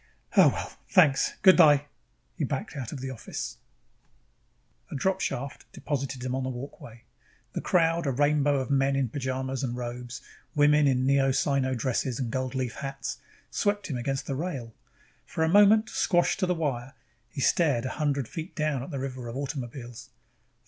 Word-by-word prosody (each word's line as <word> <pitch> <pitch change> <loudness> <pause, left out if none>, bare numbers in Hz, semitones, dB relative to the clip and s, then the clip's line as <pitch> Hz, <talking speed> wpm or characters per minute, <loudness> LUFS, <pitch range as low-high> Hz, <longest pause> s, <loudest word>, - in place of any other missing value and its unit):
Oh, - - +8
well. - - -5 0.2
Thanks. 155 -8 +4
Good 185 - +9
by." 145 -4 +6 0.5
He - - -3
backed - - -3
out 130 -5 -5
of 140 - -6
the 135 0 -4
office. 120 - -6 1.3
A - - -6
dropshaft 140 -4 -2
deposited 135 -3 -3
him 130 0 -2
on 130 0 -1
a 130 - -2
walkway. 120 -3 -9 0.5
The - - -3
crowd, 165 -2 +2
a - - +2
rainbow 145 +2 +2
of 130 +2 -3
men 135 0 +2
in 135 -3 0
pajamas 130 0 -3
and 120 -2 -2
robes, 120 0 -6 0.4
women 150 0 +5
in 130 -1 +2
Neo 135 0 +3
Sino 130 -1 +1
dresses 125 0 -1
and 120 -4 -2
goldleaf 130 -1 -2
hats, 135 -1 -5 0.3
swept 205 -4 0
him 130 - -2
against 135 +2 -2
the 140 - -3
rail. 135 -6 -4 0.5
For 160 - -1
a - - +3
moment, 205 +3 +6
squashed 175 -1 +2
to 185 - +1
the 180 - +1
wire, 135 -5 -3 0.3
he - - -8
stared 135 -4 +2
a - - -1
hundred 140 -4 0
feet 165 +3 -7
down 155 -5 0
at 135 - -7
the 140 - -4
river 130 -2 -5
of 115 +2 -5
automobiles. 125 -3 -6
135 Hz, 170 wpm, -27 LUFS, 130-150 Hz, 1.3 s, Good